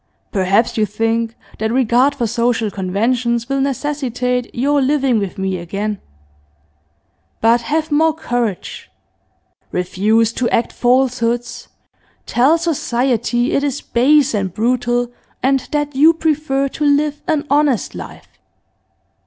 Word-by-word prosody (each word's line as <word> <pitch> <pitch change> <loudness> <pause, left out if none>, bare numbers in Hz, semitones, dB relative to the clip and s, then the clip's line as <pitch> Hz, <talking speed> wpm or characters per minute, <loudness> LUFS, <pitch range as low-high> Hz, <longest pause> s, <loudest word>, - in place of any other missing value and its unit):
Perhaps 200 +4 +1
you 215 - +3
think 225 +2 -1 0.2
that 220 0 -1
regard 255 +3 +2
for 245 -4 -1
social 230 -1 0
conventions 230 +5 -1
will 275 0 0
necessitate 255 -3 -2
your 285 +4 +1
living 265 -3 +2
with 200 -3 -4
me 190 -1 -2
again. 200 +4 -4 1.4
But 230 +1 +3
have 310 +5 -2
more 320 +2 +3
courage; 245 - -3 0.8
refuse 210 +5 +1
to 245 0 -1
act 235 - 0
falsehoods; 245 -1 0 0.6
tell 270 +7 +3
society 245 -6 0
it 280 - +1
is 285 -1 -2
base 280 +4 +3
and 195 -3 -1
brutal, 240 +3 0 0.3
and 270 +1 +3
that 295 -1 -1
you 315 +4 +5
prefer 300 -4 0
to 300 - -5
live 290 0 +1
an 310 -2 0
honest 285 -5 +2
life. - - -11
245 Hz, 120 wpm, -18 LUFS, 225-285 Hz, 1.4 s, you